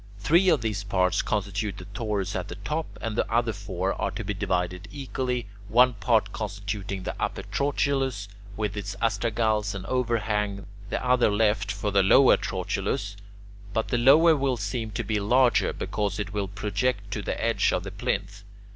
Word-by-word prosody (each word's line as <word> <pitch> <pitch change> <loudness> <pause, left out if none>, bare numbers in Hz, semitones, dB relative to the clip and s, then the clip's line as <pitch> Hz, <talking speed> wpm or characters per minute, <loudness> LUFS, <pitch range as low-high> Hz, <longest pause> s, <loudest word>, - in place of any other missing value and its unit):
Three 165 - +4
of 160 -7 +3
these 105 -3 -2
parts 95 -2 +1
constitute 100 0 -2
the 90 - -9
torus 105 -3 -2
at 90 - -3
the 90 - -7
top, 150 - -3
and 115 -2 -3
the 105 - -1
other 115 -1 +2
four 95 -1 -2
are - - +1
to - - -5
be - - -2
divided 90 +1 -2
equally, 130 -3 -3 0.2
one 125 +4 +5
part 105 0 +1
constituting 100 -2 -4
the - - -3
upper - - -2
trochilus 135 -6 0 0.3
with 105 -1 -2
its 100 -1 -4
astragals 110 -1 0
and 95 -1 -6
overhang, 105 -4 -1 0.2
the 125 - -2
other 125 -2 +4
left 105 -1 +1
for 105 +2 -2
the 100 0 +4
lower 130 +8 +6
trochilus. 100 0 -2 0.6
But 110 - -1
the 120 - +1
lower 155 +7 +6
will 135 -3 0
seem 110 +2 -3
to 110 +3 -3
be 105 0 -1
larger, 120 +4 +3
because 100 -2 -2
it 105 -1 -4
will 100 -2 -1
project 100 +2 -2
to 105 - -2
the - - -3
edge - - +2
of - - -1
the - - -6
plinth. 100 +1 -3
105 Hz, 175 wpm, -26 LUFS, 100-120 Hz, 0.6 s, lower